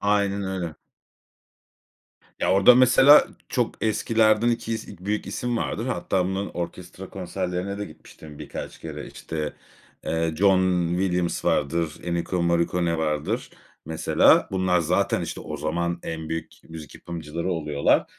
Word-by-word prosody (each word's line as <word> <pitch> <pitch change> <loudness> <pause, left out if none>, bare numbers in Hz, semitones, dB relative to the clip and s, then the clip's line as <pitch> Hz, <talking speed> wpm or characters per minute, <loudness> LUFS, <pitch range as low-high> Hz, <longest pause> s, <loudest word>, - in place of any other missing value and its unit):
Aynen 100 -1 +1
öyle. 95 -4 -3 1.7
Ya, - - +1
orada 100 +6 +7
mesela 130 +3 +7 0.2
çok 120 -3 -1
eskilerden 110 +1 +3
2 115 -1 -1
is 110 - -5
büyük 100 +2 -4
isim 120 -1 -2
vardır. 115 0 -2
Hatta 95 -7 0
bunun 95 +2 -2
orkestra 90 +2 -7
konserlerine 95 +1 -4
de 105 - -4
gitmiştim 75 -2 -13
birkaç - - -7
kere. - - -7
İşte, 75 -2 -5 0.5
ııı, 80 -1 -1
John 95 -1 +3
Williams 90 -1 -1
vardır, 75 +2 +1
Ennio 85 +1 -1
Morricone 85 0 +1
vardır 75 -2 -1 0.4
mesela. 80 +1 +4
Bunlar 95 -2 +2
zaten, 90 +5 +1
işte, - - -5
o 75 - -6
zaman 85 +3 -2
en 80 -1 -5
büyük 80 -1 -4 0.2
müzik 80 -2 -9
yapımcıları 85 +1 -5
oluyorlar. 75 -4 +1
90 Hz, 130 wpm, -24 LUFS, 80-100 Hz, 1.7 s, orada